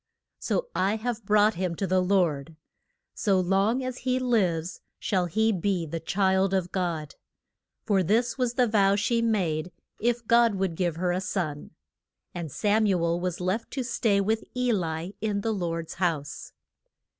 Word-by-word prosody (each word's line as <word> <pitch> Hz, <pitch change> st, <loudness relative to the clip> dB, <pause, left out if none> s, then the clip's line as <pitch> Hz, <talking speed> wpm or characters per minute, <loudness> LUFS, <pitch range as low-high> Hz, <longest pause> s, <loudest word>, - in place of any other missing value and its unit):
So -, -, -1 dB
I 195 Hz, +3 st, +1 dB
have 225 Hz, -1 st, -4 dB
brought 210 Hz, +1 st, +4 dB
him 180 Hz, -1 st, -2 dB
to 195 Hz, -, -2 dB
the 185 Hz, 0 st, +2 dB
Lord; 165 Hz, -5 st, +1 dB, 0.6 s
so 195 Hz, -3 st, +1 dB
long 195 Hz, +7 st, +1 dB
as 255 Hz, -1 st, -4 dB
he 255 Hz, 0 st, 0 dB
lives 190 Hz, -10 st, 0 dB, 0.2 s
shall 185 Hz, -3 st, 0 dB
he 220 Hz, +6 st, +2 dB
be 185 Hz, -2 st, 0 dB
the 165 Hz, +2 st, -4 dB
child 190 Hz, +2 st, +1 dB
of 180 Hz, -2 st, -1 dB
God. 170 Hz, -5 st, -2 dB, 0.7 s
For 200 Hz, -3 st, +2 dB
this 225 Hz, +7 st, +1 dB
was 250 Hz, -2 st, -1 dB
the 250 Hz, -, +4 dB
vow 200 Hz, -3 st, +3 dB
she 230 Hz, +3 st, +1 dB
made 180 Hz, -7 st, 0 dB, 0.3 s
if 235 Hz, +1 st, 0 dB
God 235 Hz, -1 st, +4 dB
would 190 Hz, -2 st, -1 dB
give 175 Hz, -1 st, -1 dB
her 180 Hz, +1 st, 0 dB
a 180 Hz, +1 st, -1 dB
son. 160 Hz, -6 st, -3 dB, 0.6 s
And 170 Hz, -4 st, -5 dB
Sam 215 Hz, +6 st, +2 dB
u 190 Hz, -3 st, +2 dB
el 170 Hz, +1 st, +1 dB
was 180 Hz, -1 st, -3 dB
left 185 Hz, +5 st, -2 dB
to 265 Hz, -, -2 dB
stay 225 Hz, -4 st, +1 dB
with 220 Hz, +3 st, 0 dB
E 250 Hz, -1 st, +2 dB
li 170 Hz, -1 st, -2 dB
in 205 Hz, -2 st, -1 dB
the 225 Hz, +1 st, -1 dB
Lord's 165 Hz, -4 st, -3 dB
house. 160 Hz, -6 st, -3 dB
195 Hz, 170 wpm, -27 LUFS, 175-220 Hz, 0.7 s, brought